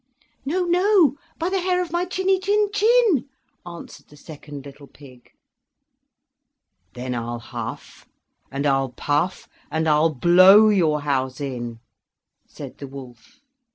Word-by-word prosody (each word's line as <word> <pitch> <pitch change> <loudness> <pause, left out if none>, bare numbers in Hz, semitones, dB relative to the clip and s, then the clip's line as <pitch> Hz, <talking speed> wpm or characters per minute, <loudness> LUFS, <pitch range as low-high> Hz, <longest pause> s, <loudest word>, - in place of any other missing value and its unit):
"No, 355 +7 -1
no, 360 - +3 0.2
by 335 +2 -2
the 380 -1 -1
hair 360 0 0
of 355 -3 -3
my 345 +1 -1
chinny 375 +1 0
chin 410 +2 +1
chin," 430 - +2 0.4
answered 170 -1 -11
the 150 - -18
second 145 -2 -11
little 140 0 -13
pig. 130 -4 -17 1.7
"Then 125 +1 -5
I'll 120 0 -4
huff, 115 - -9 0.4
and 140 +2 -4
I'll 135 -1 +1
puff, 150 +6 -2 0.2
and 160 0 -1
I'll 155 +1 +3
blow 185 - +6
your 160 -7 +1
house 130 -2 -2
in!" 120 -5 -6 0.7
said - - -11
the 140 - -7
wolf. 130 - -13
160 Hz, 130 wpm, -22 LUFS, -, 1.7 s, blow